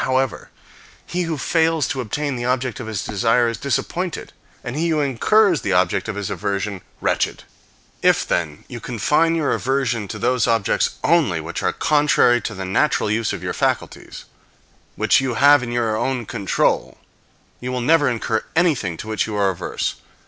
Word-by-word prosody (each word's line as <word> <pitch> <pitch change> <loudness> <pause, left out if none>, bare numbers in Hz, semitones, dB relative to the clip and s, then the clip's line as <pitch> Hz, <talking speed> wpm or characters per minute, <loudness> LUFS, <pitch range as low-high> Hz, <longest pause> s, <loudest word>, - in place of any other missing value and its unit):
However, 130 0 -1 0.6
he 180 - -2
who 160 - -2
fails 160 0 +1
to 130 - -2
obtain 140 +5 -3
the 120 - -4
object 125 -1 -1
of 120 - -6
his 110 -3 -3
desire 115 +3 +2
is 115 - -3
disappointed, 170 +6 -3 0.3
and 120 +1 -5
he 165 +3 0
who 155 -2 +1
incurs 165 - +3
the 100 - -1
object 90 0 +1
of 110 - -3
his 100 -2 -4
aversion 100 -1 -3 0.2
wretched. - - 0 0.6
If, - - +3
then, 80 -3 -2
you 120 - -7
confine 150 +9 +1
your 155 -3 0
aversion 130 -5 -1
to - - -6
those 125 -2 +1
objects 115 -3 +1
only - - +3
which - - -5
are - - +1
contrary 145 -5 +3
to 110 - -5
the 95 0 -5
natural 105 +3 +1
use 110 0 0
of - - -5
your - - -2
faculties, - - -3 0.7
which - - +3
you 130 -3 -2
have 145 +3 +6
in 120 -1 -5
your 115 -2 0
own 120 +1 -1
control, 100 -2 0 0.6
you 125 +1 -4
will 125 - -2
never 145 +4 +3
incur 115 -2 -1
anything 145 - +1
to 105 - -8
which 110 0 -1
you 110 - -4
are 100 -2 +2
averse. 90 - -3
120 Hz, 180 wpm, -21 LUFS, 110-145 Hz, 0.7 s, have